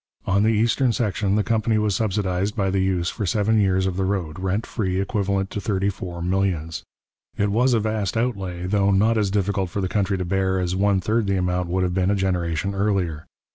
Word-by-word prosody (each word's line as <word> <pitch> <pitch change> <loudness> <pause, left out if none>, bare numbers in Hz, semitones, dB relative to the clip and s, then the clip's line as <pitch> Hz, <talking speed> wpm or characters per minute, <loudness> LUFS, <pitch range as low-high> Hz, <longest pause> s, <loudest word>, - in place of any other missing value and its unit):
On 100 +1 +2
the 110 - +3
eastern 115 +4 +2
section, 105 -3 0
the 105 - +2
company 110 0 +1
was 105 -2 +1
subsidized 100 -1 -1
by 95 -3 0
the 95 - +1
use 95 -2 0
for 105 -5 -3
seven 110 +3 +2
years 95 -2 +2
of 95 -1 -2
the 95 - 0
road, 95 -5 -2
rent 95 +4 -1
free, 95 -5 -2
equivalent 100 -1 -1
to 105 - -4
thirty 100 -2 0
four 90 -3 -7
millions. 90 -3 -1 0.6
It 100 0 +1
was 125 +4 +3
a - - +3
vast 110 -1 -1
outlay, 95 -7 -2
though 100 +1 +2
not 105 +4 +3
as 105 -3 +1
difficult 95 -1 0
for 100 - -4
the 95 - 0
country 100 0 0
to 90 - -3
bear 95 +1 0
as 90 0 -1
one 100 0 +2
third 110 +2 0
the 100 0 +1
amount 90 -1 -1
would 95 +1 0
have 90 -1 0
been 95 0 +1
a 100 - +2
generation 95 0 -1
earlier. 95 -6 -1
95 Hz, 215 wpm, -23 LUFS, 95-105 Hz, 0.6 s, the